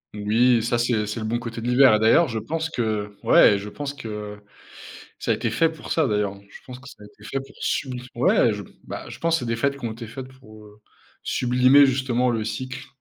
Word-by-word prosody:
Oui, 115 +4 +3
ça, 120 +1 0
c'est 115 -3 0
c'est 110 +2 -4
le 110 - -4
bon 120 +2 -1
côté 115 -1 -7
de 115 - -5
l'hiver. 125 -3 +5
D'ailleurs, 115 +10 +4
je 115 - -4
pense 160 +9 -3
que 105 -7 -3
ouais, 100 - +6
je 100 +1 -7
pense 145 +5 -6
que 105 -5 -7 0.8
ça - - 0
a - - +2
été - - -2
fait 165 - +2
pour 160 -1 -10
ça 160 -3 +2
d'ailleurs. 105 -3 -1
Je - - -14
pense 125 -1 -10
que 130 +1 -14
ça 105 - -14
a - - -11
été 105 0 -19
fait 135 +5 -3
pour 135 +1 -14
subli 125 -2 -3
ouais, 120 -1 +3
je, 105 0 -5 0.2
bah, - - -8
je - - -10
pense 165 0 0
que - - +3
c'est 125 - -5
des 115 0 -1
fêtes 140 +4 0
qui 140 - -11
ont 115 - -2
été 115 +1 -9
faites 130 +4 -8
pour, 110 -5 -16
heu, 105 0 -18 0.4
sublimer, 125 +3 +4
justement 125 -2 0
le 115 -2 -2
cycle 130 +3 -6
120 Hz, 240 wpm, -23 LUFS, 110-130 Hz, 0.8 s, ouais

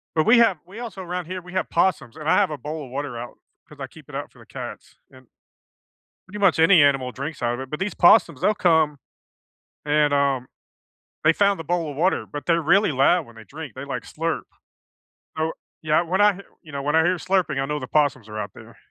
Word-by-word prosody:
But 155 - +2
we 235 +1 +6
have 210 -8 +4
we 195 +6 -12
also 220 -6 -7
'round 180 -1 -4
here, 185 0 -6
we 180 +1 -12
have 185 - -1
possums, 170 -9 0
and 155 0 -6
I - - +4
have - - +3
a 150 - -5
bowl 150 +1 -6
of 130 - -12
water 135 -2 -4
out 120 +1 -9 0.3
'cause - - -15
I - - -4
keep - - -17
it - - -12
out - - -5
for - - -22
the - - -16
cats, - - -9
and 130 -1 -18 1.0
pretty 210 +2 -8
much 195 -5 +3
any 165 0 +6
animal 135 -3 +2
drinks 140 +3 -6
out 120 0 0
of 120 - -6
it, 130 0 -8
but 150 - -4
these 195 +2 -2
possums, 185 +5 +5
they'll 215 - +2
come 160 -6 +2 0.9
and, 150 -1 +2
um, 140 -3 +1 0.8
they 155 +1 +5
found 200 0 +2
the - - -5
bowl 170 0 -1
of 140 - -8
water 180 +5 +1
but 145 - -6
they're 170 -1 +2
really 185 +5 +3
loud 145 +5 +3
when 115 -2 -17
they 115 - -12
drink, 150 +3 -9
they, 130 +2 -7
like, 140 - -5
slurp. 165 +1 -3 1.0
So, 160 +1 0 0.3
yeah, 155 +1 +2
when 185 +4 0
I 205 -1 +5
h - - -9 0.2
you 155 - -13
know, 140 -1 -4
when 150 +2 0
I 160 - +5
hear 180 +2 +1
slurping, 180 -6 0
I - - -1
know 150 +1 -3
the - - -7
possums 140 -7 +1
are 105 0 -6
out - - -5
there. - - -14
155 Hz, 240 wpm, -23 LUFS, 140-180 Hz, 1.0 s, we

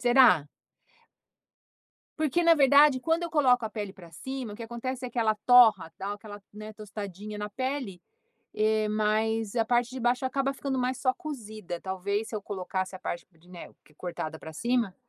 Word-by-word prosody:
Será? 240 - +5 1.7
Porque 310 +2 +1
na 335 0 +7
verdade, 280 -1 +6
quando 330 +4 0
eu 335 - -5
coloco 250 -6 +3
a 215 - -3
pele 205 -3 -5
para 175 -4 -14
cima, 255 +5 -6
o - - -9
que 230 - -8
acontece 250 +3 -5
é 245 - -4
que 240 - -5
ela 220 -1 +3
torra, 220 -10 +6
dá 200 +1 -4
o - - -1
aquela, 205 -1 -10
né, 215 +1 -9
tostadinha 210 -1 -7
na 210 0 -5
pele, 255 -5 -3 0.5
eh, 215 0 +2
mas 215 +1 0
a 225 - +3
parte 240 0 +2
de 260 - -6
baixo 245 +2 +1
acaba 275 +1 0
ficando 270 -1 -3
mais 255 0 -1
só 255 -1 +2
cozida, 215 - -7
talvez 200 +3 -2
se 220 - -5
eu 210 - -3
colocasse 190 -1 -4
a - - -9
parte 170 - -5
de 165 +2 -25
né, 175 -2 -10 0.3
cortada 160 -3 -5
para 160 - -9
cima, 230 +1 0
220 Hz, 185 wpm, -28 LUFS, 200-255 Hz, 1.7 s, na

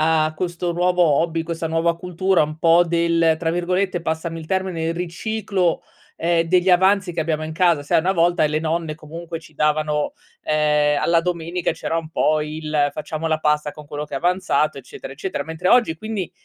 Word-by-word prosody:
a 155 0 +2
questo 175 +1 -2
nuovo 180 +1 +2
hobby, 165 +1 +2
questa 165 0 -4
nuova 165 +1 +1
cultura 180 0 +1
un 155 +1 -4
po' 170 +1 +5
del, 170 -1 +2
tra 165 -1 -1
virgolette, 180 +2 0
passami 165 0 -3
il 160 - -10
termine, 185 -2 -1
il 165 +1 -1
"riciclo", 185 +1 -1 0.3
ehm, 170 0 +2
degli 180 +2 +3
avanzi 190 0 +3
che 165 - -2
abbiamo 155 -1 -1
in 155 - -5
casa. 170 -2 +2
Sai 145 - +2
una 185 +4 +1
volta 170 -2 +3
le 155 +1 -1
nonne, 160 -1 -2
comunque, 165 +2 -8
ci 160 - -17
davano 150 0 0 0.3
ehm, 150 -1 +2
alla 170 0 +3
domenica 170 0 -2
c'era 165 0 -3
un 160 - -6
po' 155 -1 +2
il: 150 -1 -1
"Facciamo 155 +1 -4
la 160 -1 +1
pasta 150 -1 +1
con 150 - -11
quello 145 +1 -5
che 145 - -8
è - - -1
avanzato" 170 -2 +1
eccetera, 135 +1 -10
eccetera. 170 +7 -4
Mentre 160 +3 -3
oggi 235 -10 +4
quindi, 215 -5 -4
165 Hz, 190 wpm, -21 LUFS, 155-175 Hz, 0.3 s, po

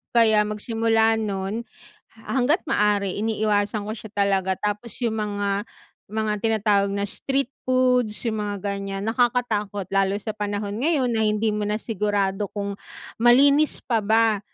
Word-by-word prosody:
Kaya 220 -2 +4
magsimula 225 +1 +1
nun, 205 +2 -3 0.5
ha 225 +4 -4
hangga't 295 +9 +2
maaari 205 -5 +1
iniiwasan 210 -1 0
ko - - -1
siya 220 - -9
talaga 195 -2 +1
tapos 210 +2 -3
yung 225 -2 0
mga 205 -1 -1 0.5
mga 215 -1 0
tinatawag 210 -2 +2
na 200 0 -1
street 270 +2 -1 0.2
foods 250 -4 +2
yung 220 - -3
mga 205 -1 -4
ganyan, 195 -1 -3
nakakatakot 225 -5 0
lalo 195 0 +2
sa 220 - -6
panahon 205 0 -3
ngayon 280 -3 +1
na 220 -1 +1
hindi 215 +1 +1
mo 210 0 -1
na 210 +1 0
sigurado 205 -2 -1
kung 200 -1 -4 0.4
malinis 280 +6 +4
pa 235 - +1
ba 220 0 +3
210 Hz, 145 wpm, -23 LUFS, 205-230 Hz, 0.5 s, Kaya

